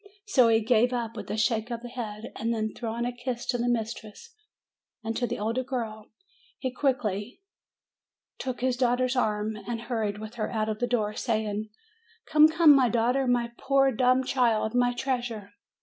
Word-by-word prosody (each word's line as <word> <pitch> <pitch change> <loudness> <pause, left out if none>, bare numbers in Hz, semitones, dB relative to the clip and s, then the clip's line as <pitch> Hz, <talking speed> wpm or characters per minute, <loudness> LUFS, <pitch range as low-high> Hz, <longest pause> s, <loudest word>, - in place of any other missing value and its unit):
So 265 - +4
he 225 0 +4
gave 240 +2 +3
up 230 -2 -3
with 210 -3 -7
a 215 - -2
shake 220 +1 +1
of 235 0 -5
the - - -6
head; 225 -3 -6
and 230 +1 -2
then, 220 -2 -1
throwing 235 0 -3
a 245 0 -3
kiss 245 -1 -4
to 245 - -1
the 240 +1 +1
mistress 225 - -4 0.7
and 225 0 -3
to 245 - 0
the - - -3
older 230 +5 -1
girl, 225 -5 -4 0.5
he 260 - -3
quickly 245 - -2 1.0
took 255 -2 -4
his 255 -1 +1
daughter's 250 +1 +1
arm 215 -3 0
again, - - -12
and 230 -1 -3
hurried 220 -4 -2
with 215 +1 -8
her - - -1
out 220 -1 -1
of 215 -1 -3
the 245 - 0
door, 215 -4 0
saying: 215 -2 -2 0.6
"Come, 305 0 +6
come 320 -2 +6
my 260 -3 +4
daughter, 245 +4 +1
my 240 -1 +1
poor 270 0 +3
dumb 255 +2 +3
child, 235 -4 +1
my 245 0 +3
treasure 240 -5 -3
235 Hz, 185 wpm, -27 LUFS, 220-250 Hz, 1.0 s, Come